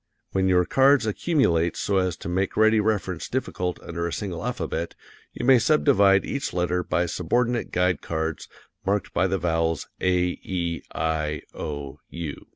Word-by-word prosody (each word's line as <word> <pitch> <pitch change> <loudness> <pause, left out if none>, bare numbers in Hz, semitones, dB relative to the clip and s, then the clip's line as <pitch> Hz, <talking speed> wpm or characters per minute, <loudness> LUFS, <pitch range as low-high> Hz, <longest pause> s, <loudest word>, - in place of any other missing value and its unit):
When 95 0 +1
your 90 -1 +4
cards 135 +2 +4
accumulate 105 - +1
so 100 - 0
as 95 -3 0
to - - -8
make 95 +2 -1
ready 110 0 +5
reference 100 -5 -1
difficult 90 -8 -2
under 85 +1 -3
a - - -4
single 95 -2 -4
alphabet, 85 -8 -3 0.4
you - - -5
may 130 -1 +7
subdivide 110 -8 +4
each 140 - -3
letter 90 0 0
by 90 - 0
subordinate 120 +8 0
guide 90 -2 +1
cards 80 -1 -3 0.4
marked 100 0 -1
by 95 - +2
the 95 +1 0
vowels, 80 -1 0
A, 90 -1 +1
E, 85 -3 -3
I, 75 -2 -1
O, 70 -1 -6
U. 85 -4 -6
90 Hz, 160 wpm, -25 LUFS, 85-105 Hz, 0.4 s, may